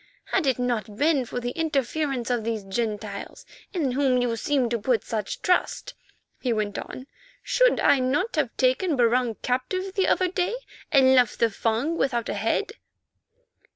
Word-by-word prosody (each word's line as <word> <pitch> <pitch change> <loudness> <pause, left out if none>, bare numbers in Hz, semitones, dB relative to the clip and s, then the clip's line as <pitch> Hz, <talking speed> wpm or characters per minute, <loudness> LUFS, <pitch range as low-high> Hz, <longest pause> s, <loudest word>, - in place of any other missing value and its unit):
"Had 285 - +1
it 260 - +2
not 230 -5 -2
been 290 -2 +2
for 245 - -4
the 245 0 -3
interference 280 -4 -1
of 240 -2 0
these 225 -2 -2
Gentiles, 215 - -4 0.3
in 315 -9 -1
whom 260 -1 +2
you 245 -2 0
seem 265 +1 +1
to 235 0 -1
put 235 +2 +1
such 215 -3 -4
trust," 365 -1 0 0.5
he 250 - 0
went 215 -2 -1
on, 255 - -8 0.4
"should - - +3
I 280 - +4
not 290 - 0
have 295 -6 +1
taken 270 +6 +2
Barung 240 -1 +2
captive 370 +10 -2
the 390 -2 +1
other 370 - +2
day, 360 +4 -1 0.4
and 265 -3 +6
left 250 -3 +3
the 230 -1 +2
Fung 230 +10 -1
without 240 -4 0
a - - -1
head?" - - -1
255 Hz, 165 wpm, -25 LUFS, 235-300 Hz, 0.5 s, and